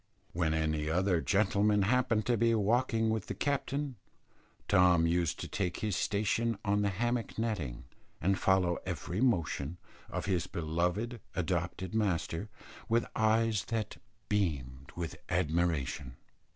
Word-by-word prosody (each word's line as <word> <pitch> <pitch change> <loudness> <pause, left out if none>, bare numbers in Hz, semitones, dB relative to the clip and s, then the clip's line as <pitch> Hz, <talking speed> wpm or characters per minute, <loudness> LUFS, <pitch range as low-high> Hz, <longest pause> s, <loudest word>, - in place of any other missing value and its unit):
When 80 -2 +1
any 80 -1 0
other 90 0 +2
gentleman 105 0 +3
happened 115 0 +2
to 120 - +2
be 115 +1 +3
walking 115 +1 +2
with 110 -3 -2
the - - -4
captain, 140 -1 -1 0.7
Tom 90 -2 +5
used 85 0 +1
to - - -4
take 90 -4 -2
his 105 -4 0
station 115 +3 0
on 100 0 +2
the 100 - +2
hammock 120 +4 -1
nettings 100 - -2 0.4
and 95 +3 +1
follow 95 -3 +2
every 90 +2 -3
motion 85 - +1 0.3
of - - -3
his 90 -2 0
beloved 90 +9 -1 0.2
adopted 90 +1 -2
master 100 -2 0 0.4
with 115 +1 +3
eyes 110 -1 +2
that 110 -2 -3 0.3
beamed 70 -10 -1
with 85 -2 -4
admiration. 80 -6 0
95 Hz, 130 wpm, -32 LUFS, 85-110 Hz, 0.7 s, Tom